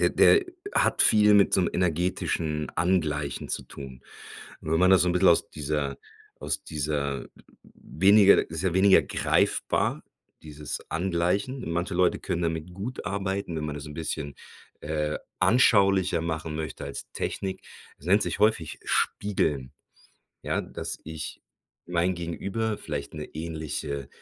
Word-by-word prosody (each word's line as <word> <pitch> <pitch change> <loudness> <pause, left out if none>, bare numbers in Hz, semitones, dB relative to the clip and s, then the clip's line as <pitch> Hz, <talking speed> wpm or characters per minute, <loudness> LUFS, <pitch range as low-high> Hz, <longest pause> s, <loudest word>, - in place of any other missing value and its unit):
der - - +3
der 405 -3 +5 0.3
hat - - +3
viel 105 -1 +5
mit 100 -1 +5
so 95 - +4
'nem - - 0
energetischen 85 -3 -1
Angleichen 80 -5 0
zu - - -3
tun. 65 -2 -10 0.6
Wenn 80 +1 0
man 95 +2 +5
das 95 - +6
so 90 - +2
'n 85 - +2
bisschen 90 +1 +4
aus 85 - +2
dieser 75 -2 -2 0.4
aus - - -2
dieser 70 -2 -2 0.5
weniger 100 +3 +4
ist 80 +2 -4
ja 90 -2 +1
weniger 95 0 +6
greifbar, - - 0 0.4
dieses 75 -1 -6
Angleichen. 90 +7 -1
Manche 85 +2 -2
Leute 90 0 +2
können 85 -2 -3
damit 80 +1 -3
gut 115 +8 -6
arbeiten, 95 -3 -2
wenn 75 - -3
man 75 -1 -4
das 75 +1 -7
'n 75 - -9
bisschen, 75 -3 -4 0.5
äh, 75 0 -2 0.2
anschaulicher 95 -4 +4
machen 80 -1 -3
möchte 80 -2 -5
als 70 -1 -7
Technik 95 -1 -4 0.4
es 75 - -15
nennt 100 +3 +5
sich - - -3
häufig 105 -7 +1
,,spiegeln." 75 -10 0 0.7
Ja, - - -1
dass - - -6
ich 80 0 -7 0.4
mein 90 +1 +1
Gegenüber, 100 +6 -3
vielleicht - - -5
'ne 75 -1 -6
ähnliche 80 -3 -4
85 Hz, 145 wpm, -27 LUFS, 75-95 Hz, 0.7 s, das